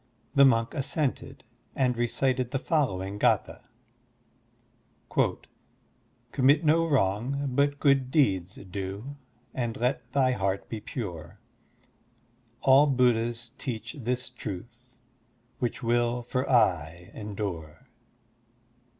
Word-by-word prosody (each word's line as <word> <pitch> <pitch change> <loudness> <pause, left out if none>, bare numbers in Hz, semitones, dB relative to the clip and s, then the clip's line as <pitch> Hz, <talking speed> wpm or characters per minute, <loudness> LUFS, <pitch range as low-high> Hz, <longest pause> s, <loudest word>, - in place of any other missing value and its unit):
The 140 0 +7
monk 115 -3 +3
assented 140 0 -2 0.3
and 125 -2 +2
recited 125 +1 0
the 135 - -1
following 100 - -1
gdtha: - - +1 2.7
"Commit 145 +5 +3
no 165 +2 +4
wrong, 130 +3 +1
but 140 +2 +1
good 135 -3 +3
deeds 95 - +1
do, 100 +7 -6 0.4
And 120 -3 -2
let 125 0 -1
thy 130 -1 +3
heart 100 -4 -1
be 110 - -4
pure, 100 - -6 1.2
All 135 +2 +6
Buddhas 120 -3 +1
teach 115 -3 -5
this 125 +1 -2
truth, 120 0 -7 0.8
Which 120 -1 -2
will 120 +1 +1
for 130 +2 -2
aye 90 - +1
endure. 100 -7 -6
120 Hz, 100 wpm, -28 LUFS, 105-135 Hz, 2.7 s, The